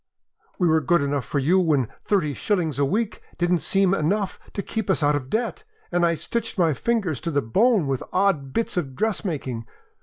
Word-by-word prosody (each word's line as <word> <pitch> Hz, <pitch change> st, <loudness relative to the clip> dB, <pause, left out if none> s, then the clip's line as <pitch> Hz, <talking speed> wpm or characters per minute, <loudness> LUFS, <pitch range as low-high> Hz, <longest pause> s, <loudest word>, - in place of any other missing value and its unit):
We 180 Hz, -, +2 dB
were 160 Hz, -1 st, +3 dB
good 165 Hz, +3 st, +3 dB
enough 140 Hz, -1 st, -1 dB
for -, -, -3 dB
you 160 Hz, +8 st, +3 dB
when 150 Hz, -9 st, +2 dB, 0.2 s
thirty 175 Hz, -8 st, +1 dB
shillings 165 Hz, -5 st, -1 dB
a 140 Hz, -, +4 dB
week 210 Hz, +9 st, -1 dB, 0.2 s
didn't 175 Hz, 0 st, +2 dB
seem 195 Hz, +2 st, +2 dB
enough 195 Hz, +4 st, 0 dB
to 200 Hz, -, -3 dB
keep 220 Hz, -3 st, -4 dB
us -, -, +2 dB
out 145 Hz, 0 st, +3 dB
of 130 Hz, -3 st, -4 dB
debt, 235 Hz, -, -2 dB, 0.3 s
and 175 Hz, 0 st, +1 dB
I 170 Hz, -1 st, +3 dB
stitched 225 Hz, +9 st, -3 dB
my 165 Hz, -4 st, +3 dB
fingers 190 Hz, -, -1 dB
to 170 Hz, -, -3 dB
the 145 Hz, -3 st, 0 dB
bone 200 Hz, -, +3 dB
with 135 Hz, -2 st, -1 dB
odd 180 Hz, -8 st, +1 dB
bits 230 Hz, +3 st, -1 dB
of 135 Hz, -7 st, -2 dB
dressmaking. 150 Hz, -, -2 dB
170 Hz, 200 wpm, -24 LUFS, 145-200 Hz, 0.3 s, a